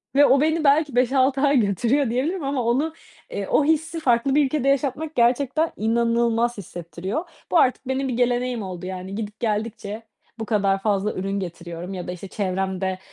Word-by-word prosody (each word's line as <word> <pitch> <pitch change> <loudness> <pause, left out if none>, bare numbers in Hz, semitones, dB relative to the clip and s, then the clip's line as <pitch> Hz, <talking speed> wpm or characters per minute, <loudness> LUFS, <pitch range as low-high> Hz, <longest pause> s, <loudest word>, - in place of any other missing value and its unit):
ve 290 +1 +7
o 275 -1 +4
beni 315 +1 +1
belki 285 -2 +3
5-6 260 +2 +3
ay 285 -1 +4
götürüyor 235 +6 +1
diyebilirim 295 +9 -1
ama 275 -3 -1
onu, 275 +8 +1 0.4
eee, - - -4
o - - +3
hissi 320 +2 0
farklı 265 0 +2
bir 295 -1 +5
ülkede 275 0 -1
yaşatmak 280 +3 -1
gerçekten 265 +6 +2
inanılmaz 235 +1 +1
hissettiriyor. 180 - -5 0.3
Bu - - +4
artık, 260 -3 +2
benim 265 +1 -1
bir 255 - -2
geleneğim 245 -2 0
oldu 180 -1 -6
yani 185 +1 -6
gidip 210 0 -6
geldikçe 215 0 -3 0.4
bu 225 - -3
kadar 200 -3 +1
fazla 205 0 0
ürün 195 +1 -2
getiriyorum 175 0 -6
ya 180 -2 -6
da - - -3
işte 180 +2 -8
çevremde, 190 -1 -2
235 Hz, 175 wpm, -23 LUFS, 195-275 Hz, 0.4 s, ve